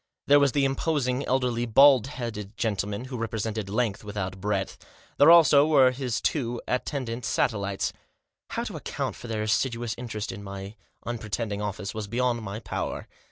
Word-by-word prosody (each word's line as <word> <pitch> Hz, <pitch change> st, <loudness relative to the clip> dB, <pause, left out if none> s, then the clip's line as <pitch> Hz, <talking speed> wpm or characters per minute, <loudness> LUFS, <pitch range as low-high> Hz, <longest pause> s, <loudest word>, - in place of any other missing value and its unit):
There 145 Hz, +1 st, +6 dB
was 140 Hz, -2 st, +3 dB
the 140 Hz, -1 st, +2 dB
imposing, 135 Hz, -2 st, 0 dB
elderly, 125 Hz, -2 st, 0 dB
bald 135 Hz, +1 st, +6 dB
headed 115 Hz, -5 st, -6 dB
gentleman, 105 Hz, 0 st, -2 dB
who 130 Hz, -1 st, -6 dB
represented 110 Hz, -2 st, -3 dB
length 110 Hz, -1 st, -1 dB
without 95 Hz, -2 st, -5 dB
breadth; 100 Hz, -1 st, -2 dB, 0.4 s
there, 145 Hz, -, +8 dB
also, 155 Hz, -4 st, +7 dB
were 135 Hz, -5 st, +5 dB
his 125 Hz, -3 st, -2 dB
two 120 Hz, -5 st, -1 dB
at 125 Hz, -, -1 dB
tendant 125 Hz, -4 st, -4 dB
satellites. 100 Hz, -4 st, 0 dB, 0.6 s
How -, -, -2 dB
to -, -, -5 dB
account -, -, -4 dB
for -, -, -10 dB
their 110 Hz, -2 st, -2 dB
assiduous 115 Hz, +1 st, 0 dB
interest 115 Hz, -3 st, -4 dB
in 100 Hz, -, -8 dB
my 100 Hz, 0 st, -7 dB, 0.3 s
unpretending 110 Hz, -2 st, -3 dB
office 100 Hz, -1 st, -4 dB
was 110 Hz, -1 st, -5 dB
beyond 120 Hz, +2 st, 0 dB
my 105 Hz, 0 st, -5 dB
power. 100 Hz, -3 st, -4 dB
115 Hz, 160 wpm, -26 LUFS, 105-130 Hz, 0.6 s, there